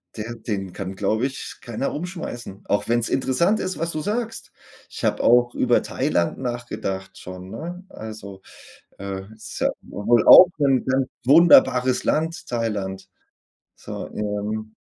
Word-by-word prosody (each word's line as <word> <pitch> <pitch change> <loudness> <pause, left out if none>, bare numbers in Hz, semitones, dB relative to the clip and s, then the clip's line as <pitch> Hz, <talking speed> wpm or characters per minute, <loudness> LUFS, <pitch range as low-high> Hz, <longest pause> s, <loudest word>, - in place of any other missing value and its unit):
der 110 +2 -5
den 100 -5 -5
kann, 95 -1 -6
glaube 110 +6 0
ich, 135 - -8
keiner 120 +3 -3
umschmeißen. 145 - -6
Auch 100 - 0
wenn's 120 0 +1
interessant 170 +11 +1
ist, 185 0 -3
was 165 +1 -2
du 155 - -3
sagst. 225 +5 -4 0.4
Ich - - -9
habe - - +1
auch 120 0 +4
über - - +2
Thailand 85 - -1
nachgedacht 120 -7 -5
schon, 90 +1 -9
ne? 175 +9 -7
Also, 105 -3 -9 0.6
äh, 95 -1 -5
ist 110 - -9
ja - - +2
w - - -17
wohl 115 -1 +4
auch 185 - +11
'n 135 -3 +2
ganz 130 0 +1 0.2
wunderbares 130 -4 +5
Land, 165 +2 -1
Thailand. 100 -5 -3 0.7
So, - - -7
ähm 105 +1 -4
120 Hz, 145 wpm, -23 LUFS, 100-135 Hz, 0.7 s, auch